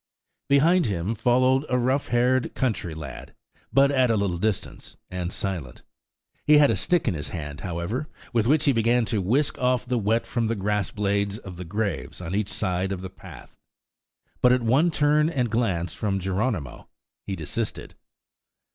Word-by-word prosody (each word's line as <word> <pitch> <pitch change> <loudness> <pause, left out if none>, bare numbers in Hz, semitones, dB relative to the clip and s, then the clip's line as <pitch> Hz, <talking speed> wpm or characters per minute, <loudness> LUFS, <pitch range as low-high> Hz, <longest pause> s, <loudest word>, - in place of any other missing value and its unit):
Behind 160 +4 +4
him 95 +1 -1
followed 130 +4 +3
a 125 - +2
rough 130 +3 +1
haired 125 +1 +1
country 105 -10 -1
lad, 75 -5 -9 0.4
but 140 +1 +4
at 130 -3 +3
a 115 - +3
little 95 -4 -1
distance, 105 0 -3
and 90 -1 -3
silent. 90 -13 -3 0.6
He 150 0 +6
had 145 -1 +6
a - - +1
stick 175 -5 +1
in 105 - +2
his 75 -3 -4
hand, 75 -2 -6
however, 95 - -3 0.2
with 115 -1 +2
which 150 +2 +3
he 140 - +5
began 115 0 +2
to 105 -2 -1
whisk 130 +11 +1
off 125 -1 +1
the 125 -1 0
wet 110 +2 +1
from 120 -2 -1
the 115 - 0
grass 105 0 -1
blades 100 0 -1
of 95 -5 -10
the 90 - -6
graves 100 0 -3
on 90 0 -5
each 100 0 0
side 95 -1 -1
of 95 -2 -3
the 95 -1 -7
path; 95 - -14 0.8
but 125 - +6
at 125 -1 +2
one 135 +9 +3
turn 150 0 +3
and 125 -8 -1
glance 95 -8 0
from 100 -2 -1
Geronimo, 95 - -3 0.4
he 95 - -2
desisted. 80 -4 -4
110 Hz, 175 wpm, -25 LUFS, 95-130 Hz, 0.8 s, He